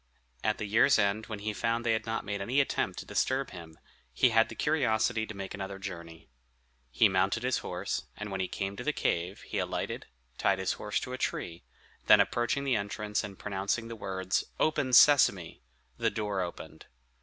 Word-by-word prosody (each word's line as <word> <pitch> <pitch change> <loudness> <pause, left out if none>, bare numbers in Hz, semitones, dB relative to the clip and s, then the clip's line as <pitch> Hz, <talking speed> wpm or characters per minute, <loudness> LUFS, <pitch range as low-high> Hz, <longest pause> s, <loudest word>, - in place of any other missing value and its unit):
At 110 - +1
the 105 - -4
year's 110 +6 +4
end, 105 +1 +1
when 110 - -5
he 105 +1 -3
found 115 +3 -1
they 115 - +3
had 110 - -2
not 115 0 -2
made 100 0 -3
any 125 +8 +1
attempt 140 - 0
to - - -6
disturb 130 +1 0
him, 80 -3 -11 0.3
he 65 - +3
had 115 0 +4
the 115 - -8
curiosity 110 -5 +1
to 110 - -8
make 95 -1 -6
another 95 0 -5
journey. 85 -5 -8 0.6
He 65 - +4
mounted 95 +4 +1
his 130 +1 +1
horse, - - -4
and 105 -1 -6
when 95 - -3
he 95 - -1
came 100 +1 -4
to 120 - -5
the 150 - 0
cave 90 -3 -1
he - - -4
alighted, - - -3 0.3
tied 100 -1 +2
his 95 0 0
horse 105 -1 -2
to 125 - -5
a 130 - -5
tree, 85 -1 -3 0.4
then - - +8
approaching 120 +4 +1
the 135 -3 +1
entrance, 105 +1 -2
and 100 -3 -8
pronouncing 100 +3 -2
the 115 - -6
words, 95 -3 -1 0.2
"Open, 145 -4 +1
Sesame!" 120 - +5 0.4
the - - +2
door 105 -3 -2
opened. 85 -1 -7
105 Hz, 195 wpm, -30 LUFS, 95-115 Hz, 0.6 s, then